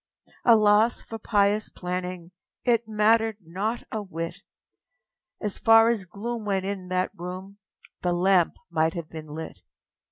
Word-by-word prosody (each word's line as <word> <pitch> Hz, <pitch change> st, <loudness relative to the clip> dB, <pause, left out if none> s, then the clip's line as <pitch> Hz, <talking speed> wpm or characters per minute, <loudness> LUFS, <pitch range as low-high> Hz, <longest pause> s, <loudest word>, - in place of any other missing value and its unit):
â 235 Hz, -, +9 dB
Alas 215 Hz, +2 st, +4 dB
for 225 Hz, -, -8 dB
pious 205 Hz, -1 st, +2 dB
planning 180 Hz, -1 st, -5 dB, 0.3 s
It 235 Hz, -2 st, +2 dB
mattered 220 Hz, 0 st, +3 dB
not 200 Hz, +6 st, -3 dB
a 220 Hz, -, -2 dB
whit! 165 Hz, -4 st, -6 dB, 1.0 s
As 210 Hz, -2 st, -3 dB
far 225 Hz, 0 st, +6 dB
as 220 Hz, -5 st, 0 dB
gloom 220 Hz, +5 st, -5 dB
went 195 Hz, -2 st, -1 dB
in 195 Hz, -2 st, -4 dB
that 185 Hz, 0 st, 0 dB
room, 185 Hz, +3 st, -8 dB, 0.4 s
The 180 Hz, -, 0 dB
lamp 180 Hz, 0 st, +3 dB, 0.2 s
might 160 Hz, 0 st, +1 dB
have 170 Hz, -3 st, -6 dB
been 155 Hz, -1 st, -8 dB
lit! 160 Hz, +2 st, -8 dB
200 Hz, 140 wpm, -26 LUFS, 180-220 Hz, 1.0 s, â